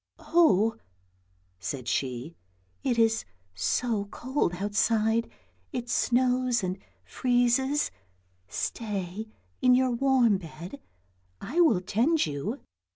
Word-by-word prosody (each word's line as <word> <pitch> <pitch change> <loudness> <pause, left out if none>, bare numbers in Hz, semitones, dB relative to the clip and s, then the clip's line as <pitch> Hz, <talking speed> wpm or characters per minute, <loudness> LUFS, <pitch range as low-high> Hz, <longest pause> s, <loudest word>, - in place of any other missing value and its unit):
" - - -54
Oh! 225 - +3 0.4
" 90 0 -40
said 120 +7 -5
she, 130 +6 -2 0.2
" 90 -1 -40
it 250 -3 +1
is 225 -1 +3 0.3
so 205 - 0
cold 245 -3 -2
outside, 220 +3 +1 0.4
it 245 -4 -4
snows 250 -2 +2
and 185 +1 -2 0.3
freezes, 255 +3 +1 0.6
stay 205 - -4 0.3
in 250 0 +6
your 255 0 +3
warm 240 -5 +3
bed, 175 - -9 0.6
I 310 +8 -3
will 230 - +4
tend 255 - +2
you." 150 - -4
225 Hz, 110 wpm, -28 LUFS, 180-250 Hz, 0.6 s, in